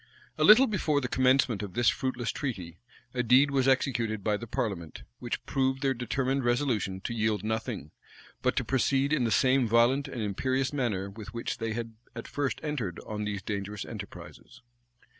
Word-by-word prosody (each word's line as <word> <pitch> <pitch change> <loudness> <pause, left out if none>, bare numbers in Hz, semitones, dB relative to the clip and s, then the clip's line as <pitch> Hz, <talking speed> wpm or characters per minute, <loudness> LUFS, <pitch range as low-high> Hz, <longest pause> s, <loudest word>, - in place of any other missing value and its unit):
A - - 0
little 225 +6 +9
before 170 - +1
the 130 - -2
commencement 130 -4 +2
of 100 -2 -7
this 120 -1 +2
fruitless 130 -3 -2
treaty, 90 - -5 0.3
a 125 - 0
deed 130 +4 +5
was 135 -1 +2
executed 120 -6 +1
by 105 +1 +1
the 120 +3 -6
parliament, 100 - -3 0.2
which - - -4
proved 135 0 0
their 135 -1 +2
determined 130 +2 -1
resolution 120 -7 0
to 120 - -4
yield 110 -3 0
nothing, 110 - -3 0.5
but - - +1
to - - 0
proceed 135 +2 +1
in 135 -5 +2
the - - +1
same 130 +4 +3
violent 120 +5 +3
and 125 -4 -4
imperious 130 +7 -1
manner 110 -9 -1
with 110 +2 -10
which 115 - -3
they 115 -1 -2
had 115 0 -5 0.2
at 115 - -6
first 145 -2 -2
entered 130 - -3
on 105 -1 -4
these 100 -2 -3
dangerous 100 +1 -4
enterprises. - - -10
120 Hz, 180 wpm, -29 LUFS, 105-135 Hz, 0.5 s, little